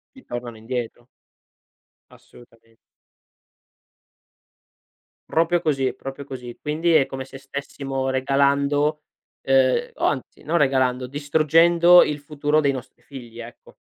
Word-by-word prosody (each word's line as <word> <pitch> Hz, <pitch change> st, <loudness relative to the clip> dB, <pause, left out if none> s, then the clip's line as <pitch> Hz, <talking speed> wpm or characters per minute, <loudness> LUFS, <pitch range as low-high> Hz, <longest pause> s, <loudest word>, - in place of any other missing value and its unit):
Ti 265 Hz, -, -16 dB
tornano 120 Hz, -1 st, -7 dB
indietro. 120 Hz, +1 st, -5 dB, 1.0 s
Assolutamen 115 Hz, -1 st, -20 dB, 2.5 s
Proprio 170 Hz, +2 st, +1 dB
così, 135 Hz, -5 st, 0 dB
proprio 135 Hz, +2 st, -8 dB
così. 125 Hz, -3 st, -9 dB
Quindi 160 Hz, +3 st, 0 dB
è 135 Hz, -4 st, +4 dB
come 135 Hz, -1 st, -6 dB
se 135 Hz, 0 st, -12 dB
stessimo 135 Hz, -1 st, -5 dB
regalando 140 Hz, +3 st, +1 dB, 0.4 s
ehm, 135 Hz, -1 st, +2 dB
o -, -, -4 dB
anzi -, -, -2 dB
non 170 Hz, +3 st, 0 dB
regalando, 130 Hz, -3 st, +1 dB
distruggendo 165 Hz, +5 st, +4 dB
il 150 Hz, 0 st, -3 dB
futuro 150 Hz, +1 st, 0 dB
dei 140 Hz, -2 st, +1 dB
nostri 130 Hz, -3 st, -9 dB
figli, 120 Hz, -4 st, -11 dB
ecco. 120 Hz, +1 st, -13 dB
135 Hz, 110 wpm, -22 LUFS, 130-150 Hz, 2.5 s, è